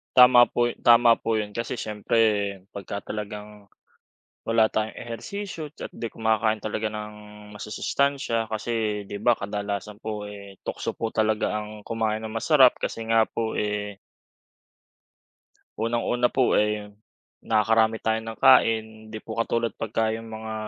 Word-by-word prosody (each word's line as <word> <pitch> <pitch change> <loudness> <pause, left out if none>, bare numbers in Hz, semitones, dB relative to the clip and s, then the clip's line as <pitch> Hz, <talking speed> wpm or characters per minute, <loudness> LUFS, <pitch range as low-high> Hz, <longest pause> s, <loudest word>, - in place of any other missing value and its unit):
Tama 125 -1 +8
po, 120 0 +1
tama 120 -1 +7
po 115 - -1
yun. 105 -1 -2
Kasi 115 +3 -3
siyempre, 110 0 -1 0.5
pagka 100 +1 -6
talagang 105 -1 -7 0.8
wala 115 -1 +3
tayong 110 0 -2
ehersisyo, 155 - -6
at - - -6
di 115 - -6
kumakain 110 -1 0
talaga 110 0 -2
ng 105 0 -5 0.4
masusustansiya, 115 +3 -1
kasi 110 -1 -2
di 100 - -4
ba, 120 +3 +4
kadalasan 100 0 -4
po 105 -1 -5
eh, 100 -1 -9
tukso - - -4
po 115 - -3
talaga 110 -1 0
ang 105 0 -8
kumain 110 0 -2
ng 110 - -5
masarap, 130 +3 +4
kasi 115 - -4
nga 115 -1 +5
po, 110 -1 -3
eh. 105 -1 -2 1.8
Unang 115 +2 0
una 125 0 0
po, 130 -2 +3
eh, 105 0 0 0.6
nakakarami 110 +1 +2
tayo 110 0 +1
ng 115 0 -7
kain. 115 -4 +6 0.3
Di 110 - -6
po 110 0 -8
katulad 115 0 0
pagka, 110 0 -1
yong 115 +1 -4
mga 110 0 -7
110 Hz, 140 wpm, -25 LUFS, 105-115 Hz, 1.8 s, Tama